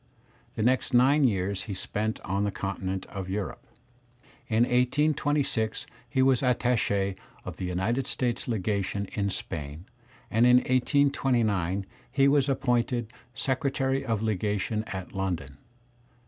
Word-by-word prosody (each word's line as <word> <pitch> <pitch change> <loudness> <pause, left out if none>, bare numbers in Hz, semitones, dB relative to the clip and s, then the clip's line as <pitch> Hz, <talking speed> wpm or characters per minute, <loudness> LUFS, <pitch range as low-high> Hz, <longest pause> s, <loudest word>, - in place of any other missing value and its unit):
The 110 - -1
next 125 +1 +2
nine 135 +4 +5
years 100 -3 0
he 100 - -5
spent 110 +3 -2
on 100 +2 -1
the 105 - +1
continent 95 -1 -3
of 95 -2 -6
Europe. 100 +1 -3 0.9
In 115 +1 +3
1826 130 -2 +1 0.2
he 130 -2 +2
was 130 -2 +4
attach^ 120 -6 +1 0.3
of - - -6
the - - -4
United 95 +9 -1
States 120 -3 -1
legation 100 -2 -1
in 100 -1 0
Spain, 75 -2 -6 0.5
and 115 +3 +4
in 125 - +7
1829 125 - +1 0.3
he 135 +1 +4
was 140 -1 +3
appointed 125 -3 0 0.2
secretary 135 +1 0
of 115 -4 -1
legation 105 +1 -1
at 95 -4 -6
London. 85 -8 -3
110 Hz, 125 wpm, -27 LUFS, 95-130 Hz, 0.9 s, in